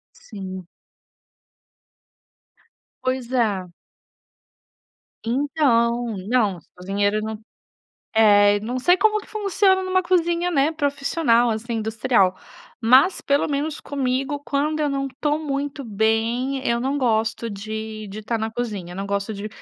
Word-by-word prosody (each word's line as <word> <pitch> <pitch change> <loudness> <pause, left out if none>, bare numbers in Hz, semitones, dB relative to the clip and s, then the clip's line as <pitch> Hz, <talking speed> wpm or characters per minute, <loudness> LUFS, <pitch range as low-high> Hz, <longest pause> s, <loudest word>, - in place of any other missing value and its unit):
Sim. 190 -4 -8 2.4
Pois 255 -1 -2
é. 210 -7 0 1.6
Então 240 -3 +1
não, 215 -7 +2
esse 160 - -20
cozinheiro 200 +3 0
não 220 0 -5 0.8
é, 205 -1 +5
não 245 +4 -3
sei 355 +8 +4
como 425 +2 +3
que - - -15
funciona 395 -2 +2
em - - -4
uma 370 0 +3
cozinha, 345 0 +1
né, 290 -3 +2
profissional, 280 -5 +1
assim, 230 +2 -3
industrial, 220 -3 +1 0.4
mas 260 +10 +5
pelo 280 +1 +1
menos 290 +1 -2
comigo, 275 +1 -2
quando 300 +2 0
eu 300 - +1
não 275 -1 -1
estou 295 +3 -1
muito 280 -1 -3
bem 230 +5 0
eu 235 - +2
não 270 +3 -1
gosto 225 -2 0
de 215 +1 -6
de 210 +2 -8
tá 230 +2 -1
na 220 +1 -2
cozinha, 210 -7 -5
não 195 +2 -4
gosto 200 +2 -2
de 205 +2 -5
240 Hz, 130 wpm, -22 LUFS, 215-285 Hz, 2.4 s, é